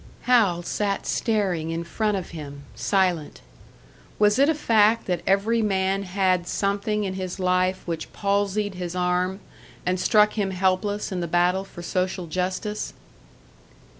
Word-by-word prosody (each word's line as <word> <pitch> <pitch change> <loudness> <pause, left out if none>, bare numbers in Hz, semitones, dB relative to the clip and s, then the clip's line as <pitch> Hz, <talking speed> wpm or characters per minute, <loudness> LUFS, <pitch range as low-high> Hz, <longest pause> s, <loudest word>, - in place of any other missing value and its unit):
Hal 210 -9 +3
sat 200 +2 -2
staring 190 -8 0
in 165 +1 -2
front 210 +4 -1
of 185 - -6
him, 145 -4 -8
silent. 180 -6 0 0.8
Was 210 +3 +3
it 280 +2 +5
a 320 - +2
fact 225 -5 +3
that 180 -2 -1
every 210 +4 +2
man 195 -2 +1
had 185 -2 0
something 205 +2 -1
in 190 -2 -2
his 185 0 -5
life 185 0 +1
which 165 -2 -4
palsied 200 0 0
his 180 -1 -5
arm, 180 +2 0 0.4
and 180 0 0
struck 210 +3 +4
him 205 -3 -1
helpless 190 +3 0
in 185 - -2
the 170 - -2
battle 175 +3 +2
for 175 -3 -11
social 185 0 -1
justice? 185 +5 -3
190 Hz, 145 wpm, -24 LUFS, 180-205 Hz, 0.8 s, it